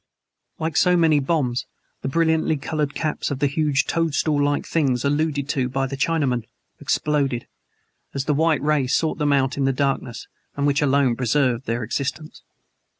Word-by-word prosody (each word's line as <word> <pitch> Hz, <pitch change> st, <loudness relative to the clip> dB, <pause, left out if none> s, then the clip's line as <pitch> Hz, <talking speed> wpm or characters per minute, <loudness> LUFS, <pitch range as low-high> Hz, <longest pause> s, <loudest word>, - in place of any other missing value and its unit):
Like 160 Hz, -1 st, -2 dB
so 180 Hz, -1 st, +4 dB
many 160 Hz, -3 st, +4 dB
bombs 135 Hz, -4 st, -1 dB, 0.3 s
the -, -, -3 dB
brilliantly 160 Hz, +1 st, +1 dB
colored 150 Hz, +1 st, -2 dB
caps 155 Hz, -2 st, -2 dB
of 140 Hz, -, -2 dB
the 140 Hz, -, +1 dB
huge 145 Hz, -1 st, +1 dB
toadstool 155 Hz, -2 st, +1 dB
like 145 Hz, 0 st, 0 dB
things 135 Hz, -6 st, 0 dB
alluded 145 Hz, -1 st, 0 dB
to 130 Hz, -2 st, 0 dB
by 135 Hz, +1 st, -1 dB
the 135 Hz, +1 st, -4 dB
Chinaman 135 Hz, -5 st, 0 dB, 0.3 s
exploded, 140 Hz, -5 st, 0 dB, 0.7 s
as 140 Hz, 0 st, -3 dB
the 150 Hz, -, +1 dB
white 155 Hz, -1 st, +2 dB
ray 150 Hz, -3 st, +2 dB
sought 155 Hz, +5 st, 0 dB
them 145 Hz, -1 st, +2 dB
out 135 Hz, 0 st, +1 dB
in 140 Hz, -, +1 dB
the 135 Hz, -, +3 dB
darkness 130 Hz, -4 st, -2 dB, 0.3 s
which 140 Hz, +1 st, +1 dB
alone 140 Hz, -3 st, +3 dB
preserved 130 Hz, 0 st, 0 dB
their 115 Hz, +1 st, -1 dB
existence. 150 Hz, +3 st, -4 dB
140 Hz, 160 wpm, -22 LUFS, 135-155 Hz, 0.7 s, so